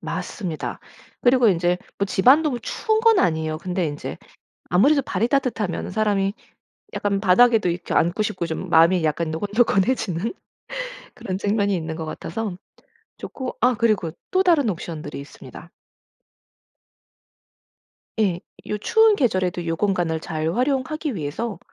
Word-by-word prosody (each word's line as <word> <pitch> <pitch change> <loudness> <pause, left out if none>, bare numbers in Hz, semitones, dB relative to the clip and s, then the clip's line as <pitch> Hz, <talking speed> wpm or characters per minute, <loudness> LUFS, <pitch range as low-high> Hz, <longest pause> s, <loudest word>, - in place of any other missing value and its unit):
맞습니다. 175 -8 -5 0.4
그리고 245 -2 +4
인제 175 0 +2 0.2
뭐 200 - +1
집안도 260 +7 +4
추운 435 - -1
건 450 -2 +5
아니에요. 160 -2 0
근데 180 0 -2
인제 145 -1 -5 0.5
아무래도 275 - +4
발이 235 -2 -1
따뜻하면은 240 -9 -1
사람이 205 -2 +1 0.6
약간 200 -1 0
바닥에도 215 +1 +4
이렇게 175 0 -4
앉고 175 +6 +2
싶고 185 -4 -2
좀 165 +3 -5
마음이 165 +1 +5
약간 155 +1 0
노곤노곤해지는 205 - 0 0.8
그런 195 -6 -4
측면이 205 0 +1
있는 160 -2 -4
것 160 - -4
같아서 180 +4 -5 0.6
좋고 260 -2 -6
아 250 0 +4
그리고 215 -7 +1 0.2
또 375 +1 +3
다른 315 - +3
옵션들이 160 -5 -5
있습니다. 140 - -12 2.5
예. 185 -5 +1 0.3
요 210 - -2
추운 445 - +4
계절에도 185 - 0
요 165 0 -1
공간을 175 -5 0
잘 160 +1 -2
활용하기 275 +3 -1
위해서 180 +7 -4
200 Hz, 310 characters per minute, -23 LUFS, 170-245 Hz, 2.5 s, 건